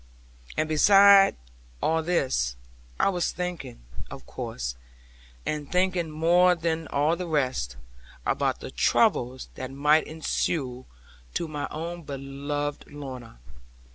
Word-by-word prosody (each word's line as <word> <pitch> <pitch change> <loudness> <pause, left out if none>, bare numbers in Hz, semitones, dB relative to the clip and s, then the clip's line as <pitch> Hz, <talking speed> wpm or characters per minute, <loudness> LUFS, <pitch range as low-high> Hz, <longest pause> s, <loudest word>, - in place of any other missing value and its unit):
And 155 - +1
beside 195 +5 +7 0.4
all 160 - +1
this, 130 - 0 0.4
I - - +4
was 180 -3 0
thinking, 175 - -5 0.3
of - - -10
course, - - -5 0.7
and 150 -2 -3
thinking 180 -2 +1
more 175 +4 +4
than 160 -1 -2
all 145 +4 +1
the 180 0 -5
rest, 130 - -1 0.5
about - - 0
the - - -7
troubles 125 +2 +1
that 130 - -6
might 150 +3 +3
ensue 140 -4 -2 0.5
to 170 - -1
my 150 -2 -4
own 170 +3 -5
beloved 145 +1 -4
Lorna. 130 - -8
155 Hz, 115 wpm, -26 LUFS, 135-170 Hz, 0.7 s, beside